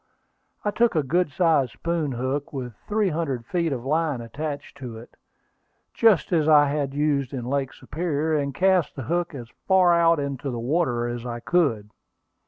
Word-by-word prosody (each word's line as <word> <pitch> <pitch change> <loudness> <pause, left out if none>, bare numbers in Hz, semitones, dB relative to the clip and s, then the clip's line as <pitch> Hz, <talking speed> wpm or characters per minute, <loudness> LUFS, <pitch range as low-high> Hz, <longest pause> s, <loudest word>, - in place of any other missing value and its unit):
I 205 - +2
took 230 -1 +2
a 155 - +2
good 175 +5 +1
sized 155 -6 +2
spoon 165 -5 -2
hook, 130 +4 -3
with 125 -4 -5
three 210 -2 +1
hundred 145 -8 -2
feet 170 +3 -1
of 125 -2 -4
line 155 -2 0
attached 145 +5 -6
to 125 -5 -7
it, 115 - -13 0.8
just 210 -5 +3
as 155 -3 +2
I 145 -2 +6
had 140 -1 -2
used 145 -3 0
it - - -3
in 120 - -5
Lake 135 0 -1
Superior, 160 0 -2
and 140 -2 0
cast 185 +2 +2
the 135 - -5
hook 170 +4 -2
as 120 -3 -8 0.2
far 185 -2 +5
out 170 -1 +4
into 140 -1 -3
the 120 - -4
water 125 -2 0
as 120 -1 -4
I 120 -1 -5
could. 115 -10 0
145 Hz, 185 wpm, -24 LUFS, 130-170 Hz, 0.8 s, I